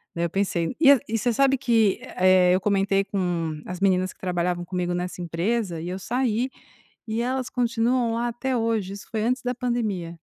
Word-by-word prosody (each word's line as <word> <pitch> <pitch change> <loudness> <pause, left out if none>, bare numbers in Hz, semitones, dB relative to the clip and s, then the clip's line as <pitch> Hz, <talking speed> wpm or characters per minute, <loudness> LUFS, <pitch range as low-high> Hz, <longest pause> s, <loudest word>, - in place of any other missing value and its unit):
né, 170 0 0
eu - - -2
pensei 190 0 -1
e 280 -3 +8 0.2
e 225 - -1
você 240 +2 +1
sabe 270 +2 +3
que, 225 -6 +2 0.2
eh, 185 -1 +5
eu 185 - +3
comentei 195 0 +2
com 170 -6 -2
as 180 -1 -6
meninas 185 -1 +2
que - - -37
trabalhavam 175 -1 -1
comigo 180 0 -2
nessa 180 0 -4
empresa 175 +2 -1
e, 170 - -5
eu 185 - -3
saí, 245 +3 0 0.6
e 220 +1 -1
elas 255 +1 -2
continuam 235 0 +1
lá 235 +1 -1
até 255 +2 -2
hoje. 225 -4 -1
Isso 200 0 -10
foi 220 - -1
antes 250 +2 0
da 250 0 -1
pandemia. 215 -9 -2
200 Hz, 190 wpm, -24 LUFS, 180-240 Hz, 0.6 s, e